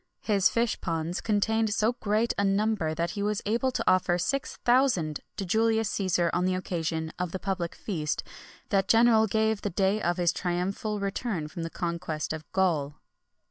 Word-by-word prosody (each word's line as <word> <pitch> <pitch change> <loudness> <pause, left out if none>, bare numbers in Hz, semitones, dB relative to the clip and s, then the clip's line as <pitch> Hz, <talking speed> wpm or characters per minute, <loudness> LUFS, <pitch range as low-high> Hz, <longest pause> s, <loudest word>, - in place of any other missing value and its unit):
His 200 -3 +3
fish 230 -1 0
ponds 165 +1 -2
contained 220 +1 +1
so 220 +4 +2
great 225 -1 0
a 200 - 0
number 200 -5 +1
that 170 +1 -1
he 205 - -4
was 210 0 -1
able 235 +5 +1
to 255 - -2
offer 185 -1 +3
six 275 +10 -2
thousand 240 - +3 0.2
to 195 - -2
Julius 220 +2 +1
Cæsar 180 -3 +1
on 180 - +1
the 185 0 +1
occasion 160 -3 -3
of 180 -2 -2
the - - -3
public 185 -3 -3
feast 155 -7 -3 0.5
that 195 -1 +2
general 225 -1 +5
gave 220 0 +1
the 205 - -2
day 195 +3 +1
of 175 -1 0
his 175 -1 +2
triumphal 190 +4 -2
return 200 -4 -2
from 165 - -7
the 165 - -3
conquest 170 -3 -3
of 155 0 -8
Gaul. 160 -7 +1
195 Hz, 180 wpm, -28 LUFS, 170-220 Hz, 0.5 s, general